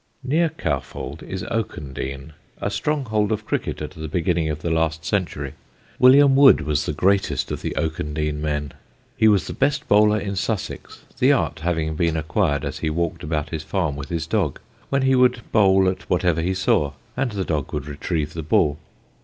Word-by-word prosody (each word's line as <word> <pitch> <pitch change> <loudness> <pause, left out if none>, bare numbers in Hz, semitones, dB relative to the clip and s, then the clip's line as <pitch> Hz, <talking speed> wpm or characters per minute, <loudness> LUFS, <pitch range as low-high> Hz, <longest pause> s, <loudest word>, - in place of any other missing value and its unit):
Near 160 +6 +2
Cowfold 85 - -4
is 95 -1 -5
Oakendene, 70 - -4 0.3
a - - -2
stronghold 115 -9 0
of 105 -1 -2
cricket 75 - -2
at 75 - -5
the 80 -3 -7
beginning 80 0 0
of 75 0 -4
the 85 - -1
last 80 0 0
century. 80 -9 -2 0.5
William 135 +2 +7
Wood 135 - +7
was 75 -1 -1
the - - 0
greatest 95 +6 +1
of - - -4
the - - -4
Oakendene 75 -1 -2
men. 75 -2 -2 0.4
He 110 - +4
was 105 -3 +4
the - - -5
best 135 +1 0
bowler 105 +1 +4
in 100 -1 -4
Sussex, 100 +2 -4 0.2
the - - +5
art - - 0
having 80 -1 -1
been 80 0 +1
acquired 75 -2 0
as - - -4
he 80 - -1
walked 85 +1 -2
about 75 0 -2
his 80 -2 -3
farm 80 -1 -1
with 70 -1 -7
his 85 -2 -2
dog, 85 -6 -1 0.3
when 135 -1 +1
he 135 0 +3
would 125 -2 +3
bowl 95 -3 +4
at 95 - -3
whatever 90 -2 +2
he 95 +3 -1
saw 75 -6 +1 0.2
and 130 -3 -1
the 95 -2 -2
dog 75 -4 -2
would 70 -2 -3
retrieve 75 +1 -3
the 80 - -4
ball. 75 -1 +2
85 Hz, 185 wpm, -22 LUFS, 75-105 Hz, 0.5 s, William